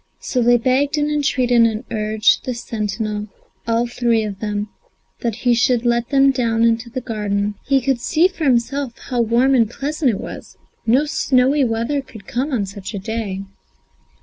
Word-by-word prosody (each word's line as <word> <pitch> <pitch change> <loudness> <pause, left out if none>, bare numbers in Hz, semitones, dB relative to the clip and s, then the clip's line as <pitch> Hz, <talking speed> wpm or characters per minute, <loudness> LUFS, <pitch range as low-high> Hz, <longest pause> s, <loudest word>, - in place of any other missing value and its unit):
So 250 - -1
they 240 +1 +5
begged 270 +5 +1
and 295 0 0
entreated 255 -5 +2
and 225 0 +2
urged 215 0 +2
the 255 - -3
sentinel, 210 -2 -3 0.4
all 230 +1 +2
three 235 -2 +1
of 200 -2 -5
them, 210 -1 -2 0.5
that 230 -3 -2
he 245 - +5
should 240 0 +2
let 235 0 +1
them 275 0 +5
down 230 -3 0
into 230 +1 +1
the 255 +2 -4
garden. 210 -3 -2
"He 275 -1 +3
could 260 -2 0
see 325 +7 +3
for 355 -4 -5
himself 265 0 0
how 245 -2 -2
warm 235 +4 +3
and 230 -5 +3
pleasant 285 +3 -1
it 215 - -1
was; - - -9 0.3
no 260 +7 +4
snowy 275 -1 +2
weather 235 +5 -1
could 220 -7 -14
come 260 +8 -2
on 225 -7 0
such 195 +1 -8
a - - -3
day." 205 -2 -4
235 Hz, 175 wpm, -20 LUFS, 220-265 Hz, 0.5 s, they